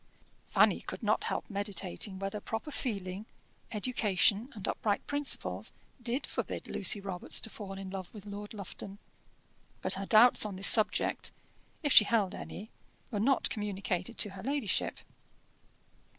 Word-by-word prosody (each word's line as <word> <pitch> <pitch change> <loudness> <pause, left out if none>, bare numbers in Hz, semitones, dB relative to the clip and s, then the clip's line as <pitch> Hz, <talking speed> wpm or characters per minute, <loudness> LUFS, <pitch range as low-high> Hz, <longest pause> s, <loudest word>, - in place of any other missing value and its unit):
Fanny - - +4
could - - -7
not - - +2
help - - -2
meditating 200 - -2
whether 195 +2 -3
proper 225 +8 -4
feeling, 200 -6 -3 0.4
education, 210 0 +2
and 205 - -5
upright 205 -2 -1
principles 285 -1 0 0.3
did 240 +3 -1
forbid - - -4
Lucy 205 +1 +2
Robarts 195 -3 +2
to 225 - -3
fall 200 -3 -7
in 195 -1 -7
love 190 -2 -6
with 210 -2 -11
Lord 205 0 -7
Lufton; 200 0 -6 0.9
but - - +1
her 195 0 -3
doubts 235 +3 +7
on 210 -2 -3
this 195 +1 0
subject, 215 -2 +3 0.5
if 290 - +3
she 210 - +9
held 210 -5 +1
any, 210 +3 -8 0.4
were 210 - -1
not 260 +5 +3
communicated 200 -1 -2
to 205 - +4
her 190 -1 -9
ladyship. 270 -3 -1
205 Hz, 145 wpm, -31 LUFS, 195-225 Hz, 0.9 s, she